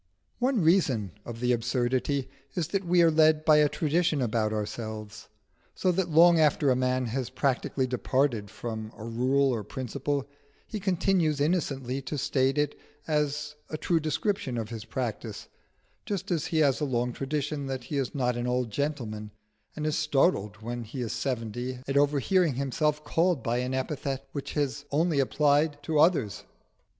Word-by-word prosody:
One 250 -3 +2
reason 140 - +3
of 115 -1 -7
the 125 0 +2
absurdity 125 +3 0 0.3
is 170 -4 -1
that 195 -1 -1
we 175 0 +5
are 165 - +5
led 155 0 +4
by 155 -1 +6
a 150 -1 +5
tradition 160 0 +1
about 110 -3 0
ourselves, 110 0 -5 0.5
so 185 - +2
that 180 0 0
long 170 +1 +6
after 150 -2 +3
a - - +3
man 130 0 +1
has 125 +2 -2
practically 130 0 0
departed 125 -3 0
from 110 0 -6
a 110 - -8
rule 130 +4 +2
or 110 -3 -2
principle, 135 +4 -3 0.4
he 215 - -5
continues 185 -5 +1
innocently 140 -5 0
to 145 +3 -4
state 135 0 +1
it 145 -1 +1 0.3
as 150 -1 0 0.2
a 155 - -3
true 165 +1 +1
description 155 - -1
of 110 -2 -3
his 115 -2 -6
practice 115 -4 -4 0.6
just 195 -1 -3
as 165 -4 0
he 160 - -1
has 140 -1 +3
a - - +2
long 125 -2 -1
tradition 145 +1 -3
that 130 -2 -4
he 145 +4 -4
is 135 0 -3
not 125 -3 +1
an 120 +1 -2
old 125 -2 0
gentleman, 115 -6 -3 0.5
and 150 - -3
is 155 -1 +1
startled 135 - +1
when 120 +1 -4
he 125 +4 -6
is 115 - -2
seventy 125 0 -3
at 135 - -2
overhearing 145 +3 +3
himself 150 +3 0
called 165 0 +1
by 120 -1 0
an 125 +1 -2
epithet 135 0 -3
which 140 -1 -5
he 150 - +1
has 140 0 -2
only 155 0 +2
applied 145 +2 +2
to 155 -2 0
others. 150 - +3
140 Hz, 170 wpm, -28 LUFS, 120-155 Hz, 0.6 s, by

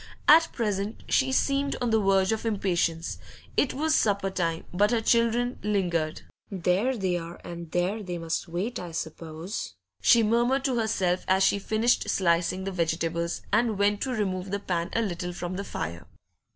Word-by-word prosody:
At 325 +2 +7
present 210 -2 -2
she 265 0 +2
seemed 275 +1 +1
on 245 -2 0
the 220 -1 +3
verge 195 0 +3
of 220 - -1
impatience; 175 -6 -1 0.4
it 280 - +2
was 310 +3 +1
supper 200 -6 +2
time, 165 -3 -2
but 205 +3 +3
her 235 0 +2
children 235 +2 +2
lingered. 175 -7 -1 0.3
'There 195 +7 0
they 185 -3 0
are, 170 +1 -9
and 170 -1 -7
there 180 +6 0
they 180 -3 -4
must 165 -1 -3
wait, 185 +8 -3
I 175 -2 -7
s'pose,' 160 - -5 0.3
she 235 -1 +6
murmured 240 +5 +2
to 255 -3 +1
herself 185 -5 0
as 190 +1 +3
she 200 - +3
finished 220 +4 +1
slicing 175 +1 +1
the 195 - -3
vegetables 170 -1 -1
and 225 -3 +2
went 205 +1 +2
to 265 - -1
remove 195 -6 -2
the 200 - -1
pan 175 -4 -2
a 230 - +1
little 180 -3 -3
from 175 +1 -4
the 200 - -3
fire. 85 - -5
195 Hz, 175 wpm, -27 LUFS, 175-225 Hz, 0.4 s, At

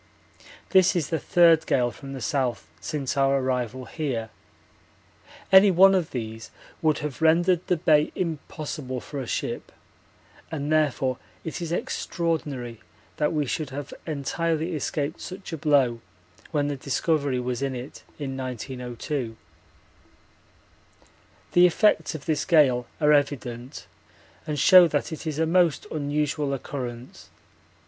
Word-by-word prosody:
This 190 0 +5
is 160 -5 0
the 160 - 0
third 165 -2 +4
gale 120 -1 +2
from 135 +2 -10
the 135 - -6
south 130 -6 -1
since 135 +6 -3
our 135 0 +3
arrival 130 -1 -2
here. 120 -5 -3 1.2
Any 190 +1 +8
one 190 +2 +6
of 180 -4 +1
these 110 -2 -6 0.3
would 155 -2 +2
have 145 -3 -6
rendered 170 +2 +3
the 180 - +2
Bay 155 -2 +3
impossible 150 -5 -4
for 140 +2 -6
a 125 - -6
ship, - - -3 0.8
and 150 -1 -3
therefore 135 -4 +1 0.2
it 160 - -5
is 165 -1 -4
extraordinary 150 - -3 0.4
that 150 -1 +1
we 150 -2 0
should 150 +2 -3
have 140 +1 -7
entirely 160 +3 -1
escaped 150 0 -3
such 185 -1 -8
a - - -2
blow 140 -6 +2 0.5
when 145 -2 0
the 145 -1 -3
Discovery 140 0 0
was 125 0 -3
in 135 -1 -1
it 125 +3 -8 0.2
in 135 -3 -4
1902. 125 -1 -5 2.1
The 175 0 +7
effects 210 -1 +2
of 150 - -8
this 155 -2 0
gale 130 -7 +4
are 150 -1 +4
evident 135 -3 -1 0.6
and 150 -1 -2
show 180 +5 +8
that 145 0 -2
it 160 +1 -6
is 150 -2 -3
a 160 - +2
most 170 -2 +2
unusual 145 -1 -1
occurrence. 125 -2 -7
145 Hz, 135 wpm, -25 LUFS, 130-160 Hz, 2.1 s, Any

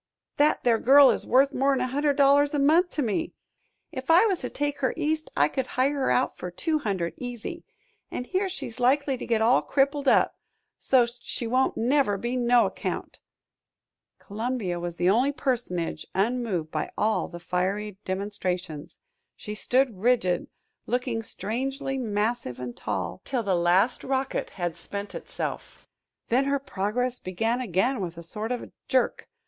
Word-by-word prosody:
"That 295 +1 +3
there 230 -2 +3
girl 275 +1 +7
is - - -3
worth 270 +3 +4
more'n 270 0 +2
a 255 - +1
hundred 285 +3 0
dollars 285 +1 +4
a - - +2
month 320 +6 +4
to 295 - 0
me. 245 +8 -1 0.6
If 260 +1 -7
I 345 +6 +7
was 385 -6 +1
to 250 - -4
take 290 0 -2
her 260 - 0
East 310 0 -1
I 145 - +5
could 260 - -3
hire 260 +4 +1
her 275 -2 0
out 255 - +1
for 180 - -6
two 310 - -1
hundred, 190 - -2
easy, 245 +7 -6 0.5
an' - - -4
here 375 +8 -1
she's 250 -10 -5
likely 270 +2 +2
to - - -7
get 225 -2 +2
all 240 +3 +5
crippled 280 0 +1
up, - - +4 0.4
so's't 245 -2 +2
she 235 - -4
won't 255 +3 +1
never 245 -3 +2
be 240 +5 -3
no 245 -1 +4
account." - - -4 1.0
Columbia 215 -4 -3
was 175 0 -4
the 175 +1 0
only 245 +9 +4
personage 230 - -2
unmoved 200 -6 0
by 155 - -2
all 215 +1 +1
the 175 - -9
fiery 190 +4 -2
demonstrations; 185 -5 -4 0.4
she 210 - -7
stood 245 -1 +1
rigid, 220 -5 +2 0.4
looking 245 -2 -1
strangely 265 +6 -3
massive 215 - -2
and 125 -1 -6
tall, - - -4
till 255 -4 -2
the 200 -2 0
last 180 +7 +2
rocket 265 0 -1
had 175 -3 -2
spent 200 +3 -6
itself. - - -6 0.4
Then 255 +4 +3
her 280 0 +1
progress 245 +1 -2
began 225 +7 -1
again 235 +3 0
with 170 -2 -5
a 170 - -8
sort 215 +7 -5
of 245 - -4 0.2
jerk. 255 -2 0
245 Hz, 165 wpm, -26 LUFS, 200-270 Hz, 1.0 s, girl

